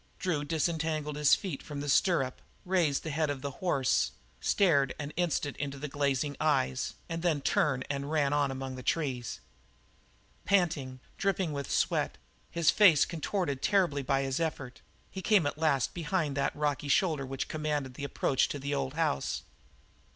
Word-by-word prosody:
Drew 165 -6 -1
disentangled 155 -1 -1
his 150 -1 +5
feet 175 -9 -5
from 145 -2 -7
the 145 - -4
stirrup, 135 -3 +2 0.2
raised 175 -6 +1
the 155 - -4
head 155 +1 0
of 140 -2 -4
the 140 - -2
horse, 140 -8 +1 0.3
stared 140 -9 +3
an 145 0 -5
instant 160 -4 -1
into 140 -1 -4
the 150 +2 -5
glazing 140 0 0
eyes, 65 - +1
and 165 0 -4
then 165 -4 +1
turned 135 -1 +1
and 140 0 -3
ran 145 -2 +1
on 145 -1 +2
among 135 0 -4
the 130 - -7
trees. 130 -5 -2 1.0
Panting, 155 -10 +1 0.2
dripping 190 -5 0
with 140 -1 -4
sweat, - - +1 0.3
his 170 -3 +3
face 180 -9 +6
contorted 165 -4 -2
terribly 180 -8 +2
by 135 +1 +1
his 135 +1 -1
effort, 135 -7 -3 0.3
he 190 - -6
came 195 -3 +4
at 145 +1 -2
last 145 -5 +2
behind 165 -3 -1
that 140 -1 0
rocky 145 -1 -1
shoulder 155 -1 +2
which 135 0 -4
commanded 150 -4 -2
the 140 - -8
approach 140 -1 +1
to - - -3
the 140 +1 -3
old 135 0 -2
house. 160 -3 -1
145 Hz, 165 wpm, -30 LUFS, 140-165 Hz, 1.0 s, face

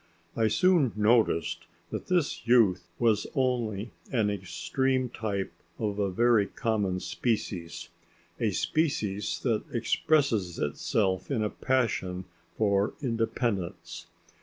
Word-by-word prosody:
I 115 -1 +3
soon 170 - +3
noticed 105 -4 +2 0.2
that - - -5
this 170 -9 0
youth 100 -8 +4
was 110 -3 +2
only 120 -5 0 0.2
an 110 -6 +2
extreme 125 +7 -1
type 100 -4 -3 0.3
of 105 -2 -2
a 100 -1 +1
very 115 +1 +3
common 105 -6 -1
species 95 -7 -3 0.5
a - - +2
species 105 -11 -1
that 115 -5 +1
expresses 115 - +1
itself 95 +5 0
in 120 -6 0
a 105 - -1
passion 95 -8 -1 0.3
for 100 -1 +2
independence. 115 -5 -2
110 Hz, 110 wpm, -28 LUFS, 100-120 Hz, 0.5 s, youth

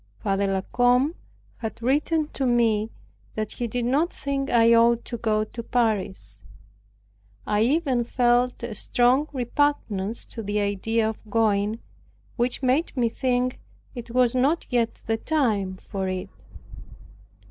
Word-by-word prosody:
Father 195 - 0
La 195 -1 0
Combe 250 +7 +2 0.4
had 220 -1 -6
written 295 +5 +1
to 270 - -2
me 225 -3 +2 0.5
that 215 -1 -3
he 240 - -3
did 240 +1 -2
not 290 +8 +1
think 275 0 -3
I 230 -1 +5
ought 235 0 +4
to 235 - -5
go 215 -2 +1
to 235 +2 -7
Paris. 210 - -1 1.1
I 210 0 +1
even 265 0 +2
felt 245 0 +1
a 235 -2 -4
strong 245 +7 +2
repugnance 240 -6 -1
to 230 - -5
the 205 0 -1
idea 210 +3 0
of 220 -1 -7
going, 215 0 +1 0.5
which 245 +2 -1
made 265 +4 +1
me 235 -2 +2
think 250 +1 -1 0.3
it 240 -2 -8
was 245 0 +2
not 275 +6 +1
yet 235 -2 0
the 225 0 0
time 220 -10 0
for 190 0 -4
it. 185 0 -4
235 Hz, 140 wpm, -25 LUFS, 215-255 Hz, 1.1 s, I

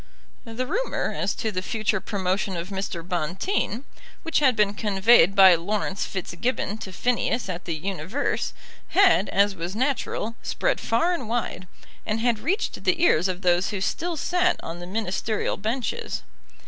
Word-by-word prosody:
The 230 +2 -3
rumour - - -1
as - - -1
to 220 - -2
the 185 -2 -2
future 215 0 -1
promotion 190 -1 -1
of 170 +2 -5
Mr. 190 -3 -4
Bonteen, 190 - -1 0.4
which 325 -1 +1
had 265 -5 +4
been 210 -2 +2
conveyed 200 -2 +4
by 190 -2 +9
Laurence 195 +3 -1
Fitzgibbon 200 +4 -3
to 190 - -7
Phineas 240 +3 0
at 185 -1 -5
the 165 - -2
Universe, 190 - -2 0.3
had, 380 - +4
as 200 +1 +3
was 175 +1 -5
natural, 245 -3 -1
spread - - 0
far 240 +11 +2
and 255 -11 -4
wide, 225 -6 -2 0.4
and 215 +1 -1
had 235 -1 +1
reached 370 - -2
the - - +2
ears 180 - +4
of 185 0 -4
those 180 +1 +3
who 205 - -3
still 335 - -2
sat 360 +3 +1
on 165 +1 -6
the 175 - -8
Ministerial 210 +2 -1
benches. 265 - -3
210 Hz, 160 wpm, -25 LUFS, 185-245 Hz, 0.4 s, by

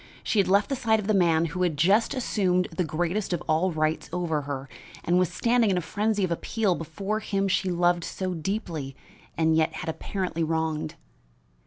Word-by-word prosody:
She 215 - +1
had 195 - +3
left 200 +2 +3
the 275 - 0
side 220 -3 +2
of 210 - -4
the 215 - +2
man 170 -4 +3
who 175 +3 -4
had 170 -5 +1
just 200 - +3
assumed 185 -7 +1
the 180 - +1
greatest 175 +5 -1
of 175 - -2
all 165 +4 +2
rights 155 0 -1
over 170 -3 -1
her 140 -1 -5 0.4
and 175 +1 +3
was 185 -1 +1
standing 230 +5 +2
in 185 - +2
a - - +1
frenzy 210 +3 0
of 185 - 0
appeal 200 +3 0
before 195 +6 -3
him 195 -2 -1
she 190 0 +1
loved 175 -1 +2
so 185 +1 -3
deeply 165 - -4 0.4
and 160 -1 +3
yet 160 0 +2
had - - -5
apparently 170 +1 -3
wronged. 160 0 -1
180 Hz, 195 wpm, -26 LUFS, 160-200 Hz, 0.4 s, had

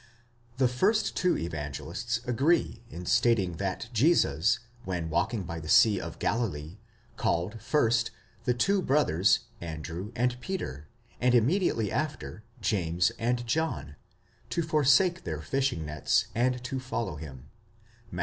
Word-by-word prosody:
THE 130 -1 +4
first 195 - +1
two 180 -1 +2
Evangelists 80 - -4
agree 135 +1 +1
in 90 -5 -8
stating 95 -6 +2
that 100 +3 -3
Jesus, 110 - +3 0.3
when 85 -5 -3
walking 100 +6 0
by 85 -1 -5
the 80 -1 -8
sea 105 -1 +6
of - - -7
Galilee, 95 -6 -2 0.4
called, 95 +6 -1
first, 115 -3 +2 0.4
the 125 - +2
two 195 +10 +2
brothers 110 - +3 0.2
Andrew 85 +4 -6
and 125 +1 0
Peter, 75 - -5 0.3
and 125 0 +3
immediately 120 - +2
after, 150 -7 -3 0.2
James 90 -1 +1
and 120 +1 0
John, 155 - -2 0.5
to 170 - 0
forsake 160 +4 +3
their 80 -3 -4
fishing 125 - -1
nets, 75 0 +1
and 125 +1 0
to 130 +1 -3
follow 120 - -3
him 70 -3 -10 0.6
(Matt. 90 - -6
115 Hz, 130 wpm, -28 LUFS, 85-130 Hz, 0.6 s, sea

